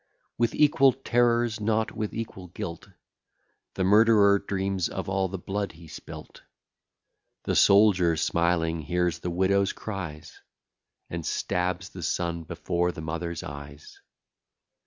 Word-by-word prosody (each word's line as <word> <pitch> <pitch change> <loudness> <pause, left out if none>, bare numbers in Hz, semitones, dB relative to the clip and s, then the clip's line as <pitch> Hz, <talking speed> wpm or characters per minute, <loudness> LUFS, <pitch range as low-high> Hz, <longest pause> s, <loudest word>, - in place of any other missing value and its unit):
With 120 -1 0
equal 140 -3 +5
terrors, 120 -3 +1
not 110 +1 0
with 105 -1 -4
equal 110 -5 -6
guilt, 85 -2 -7 0.9
The 95 - 0
murderer 105 0 +5
dreams 95 -2 -2
of - - -5
all 95 0 0
the 95 +1 -5
blood 100 +3 -4
he 80 0 -14
spilt. 75 - -11 1.0
The - - -1
soldier 95 -5 +5
smiling 85 0 +1
hears 85 +1 -1
the 90 - -4
widow's 95 +3 +1
cries, 90 -8 -7 0.7
And 85 -1 -4
stabs 90 +3 -2
the 90 - -9
son 85 0 -2
before 90 +2 -1
the 80 - -8
mother's 85 +1 -4
eyes. 70 0 -10
95 Hz, 125 wpm, -26 LUFS, 85-105 Hz, 1.0 s, equal